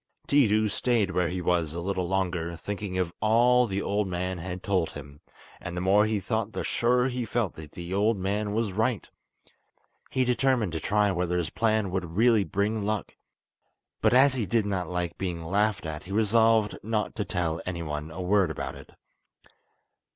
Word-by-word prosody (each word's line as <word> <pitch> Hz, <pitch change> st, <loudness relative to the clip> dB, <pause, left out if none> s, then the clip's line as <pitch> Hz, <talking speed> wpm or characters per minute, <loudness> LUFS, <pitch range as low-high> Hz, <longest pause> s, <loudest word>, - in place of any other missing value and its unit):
Tiidu 110 Hz, -7 st, +4 dB
stayed 110 Hz, -2 st, +1 dB
where 90 Hz, -2 st, +1 dB
he 90 Hz, 0 st, -3 dB
was 85 Hz, -3 st, 0 dB
a -, -, -3 dB
little 90 Hz, 0 st, -2 dB
longer, 90 Hz, -3 st, -1 dB
thinking 100 Hz, +1 st, -4 dB
of 90 Hz, -2 st, -1 dB
all 120 Hz, +3 st, +4 dB
the 100 Hz, -1 st, -2 dB
old 100 Hz, 0 st, 0 dB
man 90 Hz, 0 st, -3 dB
had 90 Hz, +2 st, -6 dB
told 95 Hz, -5 st, +1 dB
him, 70 Hz, +1 st, -10 dB, 0.4 s
and 90 Hz, 0 st, -6 dB
the -, -, -1 dB
more 100 Hz, +3 st, +4 dB
he 110 Hz, -1 st, 0 dB
thought 110 Hz, +1 st, -2 dB
the -, -, -3 dB
surer 125 Hz, +2 st, +2 dB
he 125 Hz, -1 st, -2 dB
felt 115 Hz, -3 st, -1 dB
that 75 Hz, -2 st, -11 dB
the 85 Hz, +1 st, -6 dB
old 105 Hz, +3 st, +2 dB
man 100 Hz, +2 st, -1 dB
was 110 Hz, -1 st, 0 dB
right. 110 Hz, +3 st, -1 dB, 1.0 s
He 130 Hz, -1 st, +1 dB
determined 125 Hz, -5 st, +1 dB
to 80 Hz, -, -3 dB
try 105 Hz, +3 st, +2 dB
whether 90 Hz, -1 st, -1 dB
his 85 Hz, -2 st, -2 dB
plan 110 Hz, -4 st, +1 dB
would 90 Hz, -2 st, -4 dB
really 115 Hz, -2 st, +5 dB
bring 105 Hz, +3 st, -1 dB
luck; 105 Hz, -2 st, -3 dB, 0.9 s
but 110 Hz, -, +4 dB
as 130 Hz, +2 st, +6 dB
he 120 Hz, -6 st, -2 dB
did 110 Hz, +2 st, +1 dB
not 95 Hz, -4 st, -2 dB
like 90 Hz, -1 st, -3 dB
being 85 Hz, -3 st, -3 dB
laughed 100 Hz, +2 st, 0 dB
at 75 Hz, -1 st, -6 dB
he 95 Hz, -, -9 dB
resolved 110 Hz, 0 st, +3 dB
not 110 Hz, 0 st, -2 dB
to 105 Hz, -, -2 dB
tell 85 Hz, -5 st, -2 dB
anyone 80 Hz, -4 st, -4 dB
a 85 Hz, +3 st, -7 dB
word 95 Hz, -1 st, +3 dB
about 70 Hz, -3 st, -4 dB
it. 70 Hz, -2 st, -14 dB
100 Hz, 185 wpm, -27 LUFS, 90-110 Hz, 1.0 s, as